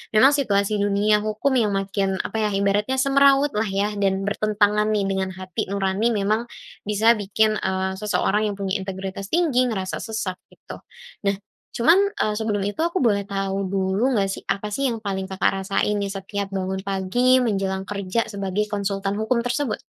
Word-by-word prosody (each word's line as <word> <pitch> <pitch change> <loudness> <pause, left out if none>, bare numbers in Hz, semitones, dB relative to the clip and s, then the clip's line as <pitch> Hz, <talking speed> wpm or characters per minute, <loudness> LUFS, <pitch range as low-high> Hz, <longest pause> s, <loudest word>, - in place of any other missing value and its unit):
Memang 265 +6 +7
situasi 205 -6 +1
di 200 - +2
dunia 205 +1 +3
hukum 215 +6 0
yang 210 -4 +2
makin, 195 0 -1
apa 220 - -4
ya, - - +1
ibaratnya 200 +5 +1
semrawut 275 +1 +4
lah 220 - +1
ya 200 +2 0
dan 195 -1 +1
bertentangan 210 0 +2
nih 205 -2 +1
dengan 190 -1 -1
hati 185 -2 -4
nurani 200 +3 +1
memang 215 +3 0 0.4
bisa 220 +3 +4
bikin, 215 +2 +1
eee, 190 0 -1
seseorang 210 0 +1
yang 205 - -3
punya 195 +1 -1
integritas 195 0 -5
tinggi 305 -8 +3
ngerasa 190 -3 -3
sesak, 220 -5 -3
gitu. - - -11 0.5
Nah 200 - +2 0.4
cuman, 365 +11 +5
eee, 405 - -1
sebelum 210 -2 -1
itu 205 +10 -3
aku 340 +2 0
boleh 215 - +2
tahu 195 -1 -2
dulu 195 +6 +1
nggak 195 - +2
sih, - - -7
apa 210 +1 -2
sih 275 +2 0
yang 230 - -2
paling 195 -3 -4
Kakak 190 0 0
rasain 195 +2 0
nih 200 - -2
setiap 195 0 -4
bangun 190 0 -3
pagi 200 +7 +2
menjelang 195 -5 -1
kerja 200 +3 -2
sebagai 200 0 -2
konsultan 200 -1 -2
hukum 235 +3 0
tersebut? 245 -2 -1
205 Hz, 175 wpm, -23 LUFS, 195-220 Hz, 0.5 s, Memang